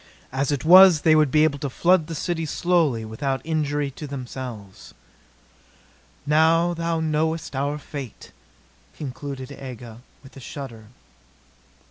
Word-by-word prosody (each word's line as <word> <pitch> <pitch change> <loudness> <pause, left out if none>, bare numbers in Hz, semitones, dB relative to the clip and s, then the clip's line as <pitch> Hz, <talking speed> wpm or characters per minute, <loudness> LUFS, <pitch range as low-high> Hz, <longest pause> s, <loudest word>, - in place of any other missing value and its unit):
As 135 +2 -1
it 140 -1 -2
was 180 -2 +8
they 155 +1 +4
would 155 -2 +4
be 155 +3 +3
able 145 -2 +1
to 145 -1 -3
flood 170 +4 +2
the 165 - -5
city 165 0 -3
slowly, 155 -9 +1
without 135 +5 -3
injury 145 -3 -1
to 150 +3 -8
themselves. 120 - -8 1.3
"Now 160 +3 +3
thou 165 -1 -2
knowest 160 -1 -1
our 140 +2 -1
fate," 140 -4 -9 0.7
concluded 140 -1 -7
Aga 125 -4 -10 0.2
with 135 - -16
a - - -10
shudder. 125 -4 -9
145 Hz, 130 wpm, -23 LUFS, 130-160 Hz, 1.3 s, was